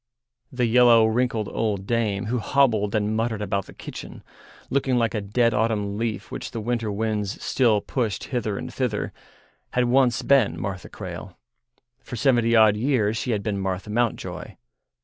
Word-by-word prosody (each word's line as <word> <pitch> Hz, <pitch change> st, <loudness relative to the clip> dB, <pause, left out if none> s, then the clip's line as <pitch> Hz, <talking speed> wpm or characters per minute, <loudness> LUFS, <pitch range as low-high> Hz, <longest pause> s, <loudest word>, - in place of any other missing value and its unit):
The 125 Hz, -1 st, 0 dB
yellow, 120 Hz, -1 st, +6 dB
wrinkled 110 Hz, -1 st, 0 dB
old 100 Hz, -4 st, -2 dB
dame 105 Hz, -3 st, 0 dB
who 120 Hz, +3 st, -1 dB
hobbled 110 Hz, -4 st, +2 dB
and 105 Hz, 0 st, 0 dB
muttered 110 Hz, -1 st, -1 dB
about 100 Hz, -1 st, -2 dB
the -, -, -12 dB
kitchen, -, -, -9 dB, 0.5 s
looking 135 Hz, -1 st, +1 dB
like 115 Hz, -2 st, +1 dB
a 105 Hz, -, -1 dB
dead 115 Hz, +4 st, +1 dB
autumn 105 Hz, -2 st, 0 dB
leaf 110 Hz, -2 st, -3 dB
which -, -, -5 dB
the 115 Hz, -, -5 dB
winter 115 Hz, -1 st, -2 dB
winds 105 Hz, -1 st, -2 dB
still 115 Hz, -6 st, +2 dB
pushed 110 Hz, -5 st, -2 dB
hither 110 Hz, -5 st, -1 dB
and -, -, -6 dB
thither, 125 Hz, -6 st, -2 dB, 0.6 s
had 125 Hz, 0 st, +2 dB
once 125 Hz, 0 st, +3 dB
been 120 Hz, -12 st, +3 dB
Martha 95 Hz, -1 st, -5 dB
Crale; -, -, -8 dB, 0.6 s
for -, -, -8 dB
seventy 120 Hz, -2 st, +3 dB
odd 110 Hz, -2 st, +6 dB
years 110 Hz, -2 st, +1 dB
she 120 Hz, -, -3 dB
had 105 Hz, -4 st, 0 dB
been 100 Hz, -2 st, -2 dB
Martha 95 Hz, +2 st, -3 dB
Mountjoy. 120 Hz, 0 st, -2 dB
110 Hz, 165 wpm, -24 LUFS, 105-120 Hz, 0.6 s, yellow